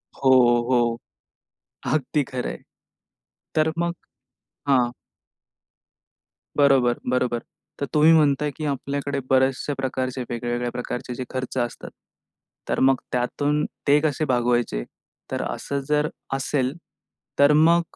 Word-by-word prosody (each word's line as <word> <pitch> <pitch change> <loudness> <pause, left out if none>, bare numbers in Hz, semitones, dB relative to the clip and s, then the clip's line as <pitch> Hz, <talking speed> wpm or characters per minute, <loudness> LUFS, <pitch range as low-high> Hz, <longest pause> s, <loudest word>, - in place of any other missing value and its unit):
हो, 135 - +1 0.4
हो. 120 -2 +2 1.0
अगदी 150 0 +1
खरं 130 -2 -4
आहे. - - -5 1.0
तर 155 0 +2
मग 170 0 0 0.8
हां. 125 -3 +4 1.7
बरोबर, 135 -4 +4
बरोबर. 125 -1 +1 0.4
तर 140 - -1
तुम्ही 155 +2 +6
म्हणताय, 150 -2 +3
की 155 - -5
आपल्याकडे 140 0 -2
बऱ्याचशा 130 +2 +2
प्रकारचे 130 -1 -2
वेगवेगळ्या 120 +1 -2
प्रकारचे 125 0 -5
जे 130 - -4
खर्च 130 0 -4
असतात, 120 -1 -3 0.8
तर - - 0
मग 135 0 +5 0.2
त्यातून 145 +4 0 0.2
ते 145 +1 +6
कसे 155 0 0
भागवायचे? 120 - +1 0.5
तर - - -1
असं 140 - -3
जर 150 0 +2 0.3
असेल 135 -1 0 0.7
तर 140 +1 +7
मग 165 +3 +5
135 Hz, 115 wpm, -24 LUFS, 125-150 Hz, 1.7 s, तर